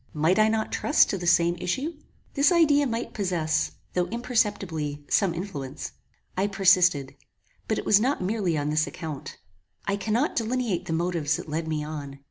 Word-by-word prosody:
Might 160 +6 +2
I 215 - +6
not 220 0 0
trust 295 - +3
to 195 - -1
the 175 - -4
same 170 0 +4
issue? 270 - -2 0.4
This 280 +4 +4
idea 295 -5 +4
might 230 0 -3
possess, 170 -6 0 0.2
though 180 -1 +1
imperceptibly, 200 - -1
some 195 -3 +3
influence. 160 -6 -5 0.4
I 190 +2 +1
persisted; 185 -7 +3 0.5
but - - 0
it - - -4
was 205 - +5
not 260 +6 +1
merely 185 -3 0
on 145 0 -1
this 155 +1 +1
account. 155 -6 -7 0.5
I 200 0 0
cannot 220 +8 0
delineate 225 -6 -1
the - - -3
motives 165 -3 0
that - - -6
led 160 +2 -3
me 155 -1 -2
on. 145 -2 -6
180 Hz, 170 wpm, -26 LUFS, 155-220 Hz, 0.5 s, I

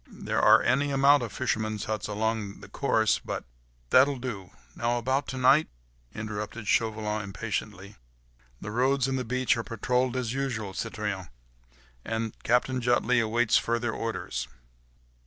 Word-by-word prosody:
There - - -2
are - - +6
any 140 +3 +2
amount 140 +1 +5
of 115 -3 -4
fishermen's 110 -4 -2
huts 110 -1 -3
all 105 - -4
along 110 -2 -2
the - - -11
coast, - - -22
of - - -33
course... 110 -6 +2
but.. - - -4 0.2
." - - -36
"That'll 135 +2 +5
do. 110 -8 -6 0.3
Now 120 +1 0
about 130 +4 0
to 130 - -5
night?" 135 +5 +5 0.5
interrupted 105 0 -5
Chauvelin, 110 -1 0
impatiently. 100 0 -5 0.6
"The 105 - -5
roads 130 +3 +2
and 130 -1 -1
the - - -2
beach 130 +2 +1
are 115 - -2
patrolled 125 +4 0
as 125 -2 -2
usual, 120 -8 -3
citoyen, 105 -5 -4 0.7
and 110 -1 -3
Captain 125 +2 +1
Jutley 125 0 +2
awaits 115 0 +3
further 120 0 -1
orders." 115 - -4
115 Hz, 155 wpm, -28 LUFS, 105-130 Hz, 0.7 s, are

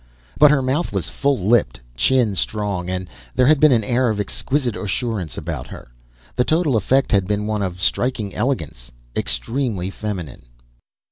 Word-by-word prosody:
But 150 +1 +8
her 145 -2 +3
mouth 135 +6 0
was - - -2
full 140 -1 +1
lipped, 100 - +2 0.2
chin 115 - +2
strong, 100 -2 -2
and 95 0 -3 0.3
there 125 - +4
had 150 +2 +5
been 155 0 +6
an 115 -3 +3
air 120 +3 +1
of 105 -2 -1
exquisite 125 +4 -1
assurance 105 - -3
about 75 -6 -5
her. - - -11 0.5
The 125 - +3
total 155 -2 +1
effect 130 +6 +2
had 100 -3 +3
been 105 0 -1
one 105 -1 -1
of 90 -2 -3
striking 110 +2 0
elegance 80 - -2 0.3
extremely 95 - -2
feminine. 90 - -6
105 Hz, 160 wpm, -21 LUFS, 90-130 Hz, 0.5 s, But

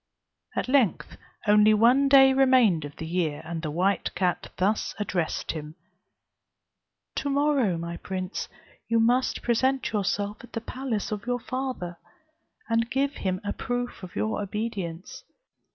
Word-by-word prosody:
At - - -1
length 240 - +2 0.3
only 210 +1 +6
one 250 +6 +5
day 270 -1 +7
remained 255 - +4
of 145 - -9
the 160 - -6
year, 160 -3 -1
when 170 0 -4
the 160 -1 -4
white 185 +6 0
cat 180 -2 -1
thus 200 +4 0
addressed 185 -6 -2
him: 155 -1 -7 1.4
"To 285 - -1
morrow, 275 - +2
my 170 +1 -5
prince, 185 0 -4 0.4
you 230 0 +2
must 245 +3 +2
present 260 +3 +1
yourself 205 +1 -1
at 245 - -14
the 230 - -2
palace 240 -3 -3
of 210 +2 -4
your 245 0 0
father, 255 -9 -4 0.7
and 230 0 +1
give 275 +2 +1
him 185 -1 -2
a 205 - -1
proof 245 -2 -3
of 185 -2 -10
your 215 -1 -1
obedience. 200 -4 -5
210 Hz, 145 wpm, -26 LUFS, 180-250 Hz, 1.4 s, day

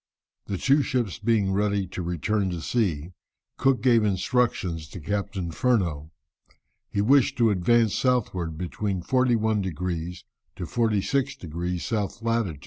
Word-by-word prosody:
] - - -61
The 100 - -2
two 140 +9 +3
ships 120 - -1
being 105 -5 +1
ready 100 0 +1
to 95 - -5
return 95 +4 -1
to 85 -2 -4
sea, 90 -7 -1 0.5
Cook 135 -2 +2
gave 120 -4 +5
instructions 95 - 0
to 90 - -9
Captain 100 0 -3
Furneaux. 85 - 0 0.8
He 100 - 0
wished 130 +4 +4
to 115 -3 +4
advance 110 +3 +3
southward 95 -11 0
between 90 +2 -3
41 115 -3 +2
degrees 90 -1 -4 0.3
to 90 - -5
46 120 - 0
degrees 85 +3 -4
S. 105 -1 -1
lat. 115 -9 0
100 Hz, 135 wpm, -25 LUFS, 90-115 Hz, 0.8 s, gave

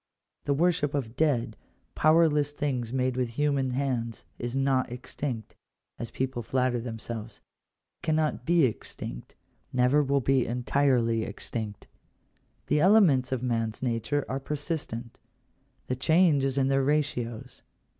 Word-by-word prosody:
The 140 - +1
worship 150 -3 +1
of 125 -5 -3
dead, 125 -8 +1 0.4
powerless 155 -2 +3
things 130 -6 -2
made 130 -1 0
with 125 -2 0
human 140 +1 0
hands 125 -3 -2 0.2
is 120 +1 -3
not 135 -2 +1
extinct, 125 -1 -5 0.4
as 115 - -4
people 130 -2 -2
flatter 125 +1 0
themselves 115 -2 -6 0.3
— - - -58
cannot 155 -1 +1
he 170 -3 +5
extinct - - -6 0.2
— - - -41
never 125 +4 +3
will 140 0 +2
be 135 -1 +2
entirely 120 -1 +2
extinct 110 -2 -5 0.8
The 150 - +2
elements 165 - +5
of 130 -2 -1
man's 115 -1 -1
nature 125 +4 0
are 135 - -2
persistent: 140 -5 -4 0.7
the 125 - -2
change 160 +1 +3
is 135 0 -1
in 135 -1 +3
their 135 0 +2
ratios. 130 -4 -1
130 Hz, 135 wpm, -28 LUFS, 120-145 Hz, 0.8 s, he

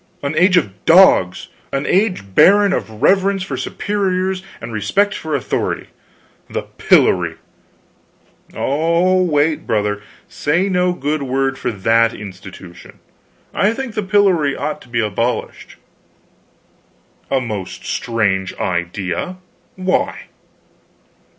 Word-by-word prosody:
"An 140 +2 -2
age 185 +3 +4
of 100 - -1
dogs, 165 - +5 0.2
an 135 +1 -2
age 185 - 0
barren 200 - +5
of 110 -8 -4
reverence 195 0 +3
for 195 - -4
superiors 190 -2 -2 0.2
and 115 +1 -8
respect 195 - +1
for 160 -7 -3
authority! 135 - -2 0.6
The - - -3
pillory - - +2 0.6
" - - -30
"Oh, 170 +6 +2
wait, 155 -3 +1
brother; 105 -1 0 0.3
say 170 +7 0
no 180 -1 +2
good 150 -3 -2
word 135 0 -1
for - - -2
that 115 +3 +2
institution. 95 -3 -11 0.6
I 205 +3 +2
think 265 -3 -5
the 215 - -1
pillory 190 -7 +2
ought 150 0 -4
to - - -17
be 120 0 -1
abolished." 115 +3 -3 1.5
"A 135 - +2
most 105 -7 -6
strange 100 -5 -1
idea. 90 - -3 0.4
Why?" 185 0 -1
150 Hz, 115 wpm, -18 LUFS, -, 1.5 s, dogs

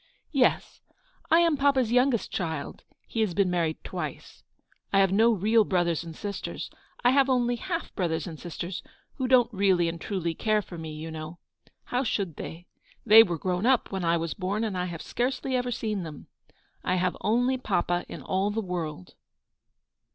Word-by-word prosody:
"Yes, 265 -4 +1 0.5
I 330 +1 +6
am 335 -3 +3
papa's 270 -4 +2
youngest 250 -1 +2
child. 160 -6 -4 0.2
He 225 - -5
has 200 -6 0
been 195 -3 +2
married 165 -3 -1
twice. - - -6 0.5
I 195 - +3
have 195 -1 +4
no 225 +4 +5
real 220 +2 +3
brothers 175 -4 0
and 165 -1 -9
sisters. 200 +2 -5 0.3
I 245 - +6
have 275 0 +4
only 245 -2 +2
half 340 +5 -4
brothers 165 -4 -1
and 160 -5 -8
sisters, 175 +1 -5 0.4
who 260 - -1
don't 245 -2 +4
really 190 -3 +3
and 165 0 -4
truly 175 -5 -2
care 215 +4 +1
for 180 - -10
me, 160 -1 -6
you 155 +1 -7
know. 155 +1 -7 0.5
How 250 +2 -1
should 195 - -2
they? 170 +2 -7 0.4
They 220 0 +10
were 175 -6 +1
grown 180 +6 -1
up 260 -2 +3
when 190 -2 -3
I 170 0 +3
was 165 -1 -2
born, 200 +3 -2
and 215 -4 -2
I 180 0 -1
have 170 -2 -6
scarcely 260 +1 -1
ever 250 0 0
seen 215 -4 -2
them. 155 -4 -8 0.6
I 180 - +1
have 180 0 0
only 245 +4 +2
papa 175 -5 0
in - - -8
all 190 +2 0
the 210 +2 -2
world." 170 - -4
195 Hz, 180 wpm, -27 LUFS, 170-240 Hz, 0.6 s, They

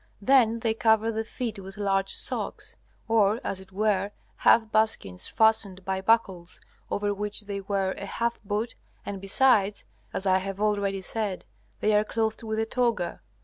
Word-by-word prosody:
Then 230 0 +4
they 225 -1 +1
cover 220 0 +3
the 220 0 -2
feet 225 -1 -5
with 195 +1 -9
large 195 -1 0
socks, - - -3 0.3
or, 220 -1 +3
as 190 - -3
it 190 0 -14
were, 200 0 +1 0.3
half 225 -1 +4
buskins 215 - 0
fastened 205 -4 +2
by 190 0 -1
buckles, 190 -5 +1 0.3
over 205 0 0
which 210 +1 -1
they 200 -1 -5
wear 195 -1 -1
a 200 - -6
half 235 +3 -2
boot, 210 +3 -2 0.3
and 200 -2 -5
besides, 205 -1 +3 0.3
as 190 - -4
I 190 -1 +4
have 195 +1 -5
already 200 -2 0
said, 210 -2 -3 0.4
they 215 - +3
are 210 - +4
clothed 220 0 -1
with 220 -1 -3
a 220 - +1
toga. 230 -7 -1
210 Hz, 165 wpm, -27 LUFS, 195-220 Hz, 0.4 s, Then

